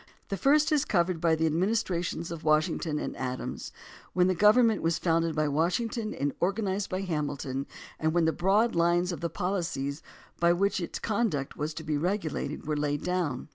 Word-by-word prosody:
The 195 - -1
first 290 - +3
is 295 -2 +3
covered 175 - +1
by 165 -2 +3
the 160 +1 0
ad 155 - +1
ministrations 175 -3 -1
of 165 -1 -6
Washington 155 0 +1
and - - -4
Adams, 125 - -4 0.4
when 180 -1 +4
the 185 - +3
government 215 +4 +5
was 165 0 +1
founded 165 -2 +1
by 155 -1 +1
Washington 210 +9 0
and 140 0 -1
organ 200 +4 0
ized 195 +1 -1
by 185 +1 -2
Hamilton, 145 -6 -3 0.3
and 160 0 +1
when 170 0 +2
the 160 - +2
broad 205 +6 +2
lines 175 +1 +2
of 170 - -6
the 170 - -1
policies 165 -6 -2 0.4
by 170 0 +4
which 195 +2 +1
its 170 - -4
conduct 205 -11 -1
was 150 +1 -3
to 160 - -6
be 150 -1 -1
regulated 165 -3 -2
were 150 0 -1
laid 145 -1 -1
down. 175 -8 -2
170 Hz, 190 wpm, -28 LUFS, 155-195 Hz, 0.4 s, government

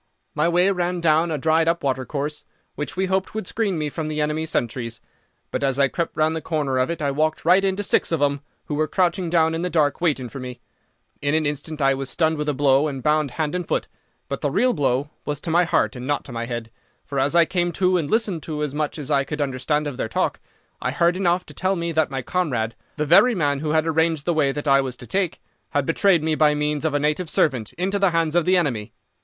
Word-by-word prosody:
"My 155 +3 +1
way 180 +3 +3
ran 180 -1 -1
down 165 0 +3
a 155 - -1
dried 160 +3 +2
up 170 +1 +1
watercourse, 140 +2 -2 0.3
which 150 +6 -5
we 190 - +1
hoped 190 +2 -1
would 220 - -3
screen 200 -3 -1
me 150 -1 -1
from 155 +2 -4
the 155 0 -3
enemy's 150 +1 -1
sentries; 115 -4 -2 0.5
but - - -2
as 135 -1 +1
I 140 -1 +3
crept 170 +3 -3
round 155 +1 +2
the 160 - -3
corner 145 -6 -1
of 130 - +1
it 170 -2 -3
I 140 - +1
walked 155 +2 -1
right 185 +3 +5
into 195 +1 0
six - - +1
of 165 - +1
them, 140 -1 +1 0.2
who - - -5
were 155 +1 +1
crouching 180 0 0
down 165 -1 +3
in 165 - -2
the 180 - -1
dark 150 -3 +1
waiting 145 -7 +1
for 135 - -8
me. 125 -1 -7 0.6
In 145 +1 +1
an 160 -1 +1
instant 145 +1 -3
I 135 0 +4
was 135 0 -2
stunned 160 0 +1
with 150 0 -1
a - - +1
blow 140 +1 +3
and 135 -4 -5
bound 150 -1 +2
hand 155 -2 -1
and 180 -1 -3
foot. - - -1 0.4
But - - -4
the - - 0
real 250 0 +2
blow 140 0 0
was 145 -2 -3
to 165 - -3
my 175 +2 +4
heart 170 - +1
and 125 +1 -6
not 145 -1 -1
to 135 - -10
my 115 0 -4
head, 120 -2 -5 0.3
for 140 - -3
as 140 +4 +1
I 170 -1 +6
came 175 0 0
to 185 -1 +2
and 145 -3 -3
listened 215 -7 0
to 150 -1 -4
as 145 -2 -3
much 150 +1 -2
as 150 -1 -5
I 140 -1 +3
could 150 +2 -5
understand 145 +2 -1
of 145 -4 -4
their 110 - -2
talk, - - -1 0.4
I 125 - 0
heard 170 +6 +2
enough 180 -1 +1
to - - -12
tell 190 +1 0
me 170 -1 -2
that 160 -1 +1
my 135 -1 -4
comrade, 125 -10 -1 0.2
the 150 - -1
very 225 +10 +6
man 145 -5 +1
who 155 +1 -3
had 155 +1 +2
arranged 160 -2 +1
the 175 - +1
way 150 -4 +2
that 145 +2 -5
I 140 0 +5
was 130 -2 -5
to - - -10
take, 190 -3 -1 0.3
had 145 -1 0
betrayed 170 +1 +3
me 160 0 +1
by 150 -1 +3
means 150 +1 -1
of 155 -2 0
a - - +2
native 150 +4 0
servant 130 -10 +1
into 190 +4 -1
the 195 -1 +4
hands 165 -2 0
of 175 -2 +3
the 185 0 +4
enemy. 125 -11 -1
155 Hz, 255 wpm, -23 LUFS, 140-170 Hz, 0.6 s, I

